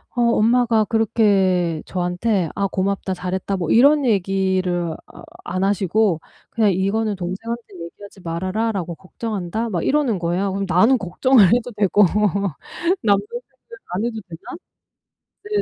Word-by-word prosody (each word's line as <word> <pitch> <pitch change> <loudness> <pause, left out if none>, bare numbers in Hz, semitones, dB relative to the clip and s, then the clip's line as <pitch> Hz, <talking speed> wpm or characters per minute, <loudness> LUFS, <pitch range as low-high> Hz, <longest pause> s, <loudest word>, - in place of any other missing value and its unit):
어 240 - +1
엄마가 230 -1 +3
그렇게 195 -7 +1
저한테 180 0 -1
아 200 0 0
"고맙다. 190 0 -2
잘했다." 185 +2 -3
뭐 170 -3 -3
이런 285 +4 +5
얘기를 190 -4 0
아 - - -15 0.3
안 185 +1 -1
하시고 195 -2 +1 0.3
그냥 215 -3 +2
"이거는 205 +3 0
동생한테 195 +6 -5 0.2
얘기하지 200 +3 -12
말아라."라고 185 +1 -2
"걱정한다." 215 +3 -4
막 175 -5 -2
이러는 265 -9 +1
거예요. 180 +3 -1
그럼 195 0 -2
나는 220 +9 +4
걱정을 210 +4 +3
해도 245 0 0
되고 205 0 +4 1.0
남동생은 215 - -1 0.4
안 210 +5 -1
해도 225 -2 -3
되나? 165 - -10 0.9
네네. 415 0 -1
200 Hz, 305 characters per minute, -21 LUFS, 180-225 Hz, 1.0 s, 이런